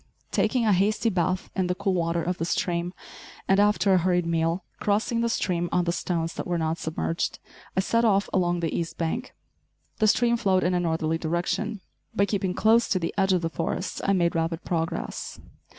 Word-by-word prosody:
Taking 250 -3 +1
a 210 - +4
hasty 210 +4 +2
bath 185 0 -1
in 185 -2 +1
the 180 - 0
cool 200 0 0
water 170 -1 0
of 180 +1 -2
the 165 - 0
stream, 175 0 -1 0.6
and 195 +1 +4
after 205 -1 +4
a 185 - +5
hurried 180 0 +1
meal, 165 +1 0 0.2
crossing 220 +3 +1
the 235 - +1
stream 175 -5 0
on 180 - +2
the 170 - 0
stones 170 -1 -2
that - - -5
were 175 -1 0
not 160 0 -1
submerged, 165 +1 -2 0.4
I - - +5
set 230 +4 +1
off 200 -3 +3
along 175 -2 +1
the 165 -2 -1
east 165 -1 -3
bank. 200 +10 -3 0.6
The 215 - +4
stream 235 +2 +3
flowed 190 -5 +2
in 180 - +1
a 180 - +2
northerly 160 -1 0
direction. 180 +6 -2 0.3
By 200 - +3
keeping 190 -3 -1
close 225 +2 +4
to 190 - +2
the 165 -2 -2
edge 195 -1 +2
of 180 -2 +1
the 165 - 0
forest 165 0 -3
I 195 - +2
made 170 -3 +2
rapid 165 0 -1
progress. 165 -2 -3
180 Hz, 200 wpm, -26 LUFS, 170-200 Hz, 0.6 s, a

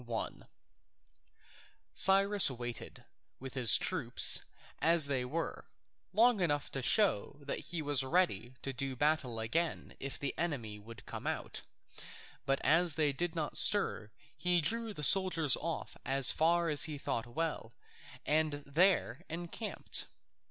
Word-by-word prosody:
1] 115 -2 -6 1.5
Cyrus 195 0 +4
waited, 120 -2 -8 0.3
with 130 0 -9
his 125 -6 +5
troops - - +5 0.4
as 165 -2 +4
they 135 -3 -2
were, 155 +7 -5 0.4
long 225 +3 +3
enough 145 -4 -1
to 135 - -4
show 145 - +1
that 140 - -5
he 170 -2 -4
was 145 -2 +1
ready 130 - -1
to 135 - -4
do 135 0 -4
battle 140 -4 -1
again 160 +10 -3
if 140 0 -6
the 140 - -4
enemy 120 -11 -4
would 110 0 -14
come - - -7
out; - - -5 0.9
but 135 0 0
as 165 0 +3
they 150 -3 0
did 175 +4 -3
not 155 -3 -4
stir 155 - +3 0.3
he 180 -1 +1
drew 225 +8 -2
the 150 -7 -8
soldiers 170 -5 +3
off 165 0 -6
as 135 +1 +4
far 170 +2 +1
as 150 -2 +3
he 155 -2 -4
thought 120 -4 -4
well, 150 -3 -4 0.5
and 155 0 +1
there 175 +6 +1
encamped. 175 +6 -2
150 Hz, 140 wpm, -32 LUFS, 130-175 Hz, 1.5 s, his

